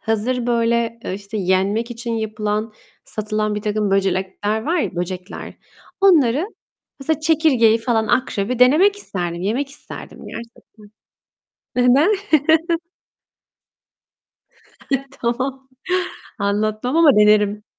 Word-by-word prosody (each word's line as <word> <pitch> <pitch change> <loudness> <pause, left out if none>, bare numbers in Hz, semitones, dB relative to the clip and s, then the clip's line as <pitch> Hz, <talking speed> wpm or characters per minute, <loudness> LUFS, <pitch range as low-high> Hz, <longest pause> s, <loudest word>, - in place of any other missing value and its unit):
Hazır 235 +3 -1
böyle, 235 -1 +1
eee, 185 - -3
işte 200 +2 -7
yenmek 200 +4 0
için 235 0 -5
yapılan, 215 0 -2 0.3
satılan 215 0 -2
birtakım 210 0 -1
böcekler 195 +2 0
var 330 +8 0
ya, 245 - -2
böcekler, 180 +1 -5 0.5
onları, 315 -5 +4 0.5
mesela, 315 +3 -1
çekirgeyi 295 -9 +3
falan, 225 -1 0
akrebi 245 -2 0
denemek 310 +12 +5
isterdim, 175 - -4
yemek 245 +8 -1
isterdim 295 - -9
gerçekten. 235 0 -9 1.1
Neden? 265 +11 +4 2.8
Ay, 275 0 0 0.2
tamam. 260 +3 -2 0.7
Anlatmam 215 +6 -1
ama 315 -7 +6
denerim. 210 0 +4
225 Hz, 100 wpm, -20 LUFS, 210-255 Hz, 2.8 s, ama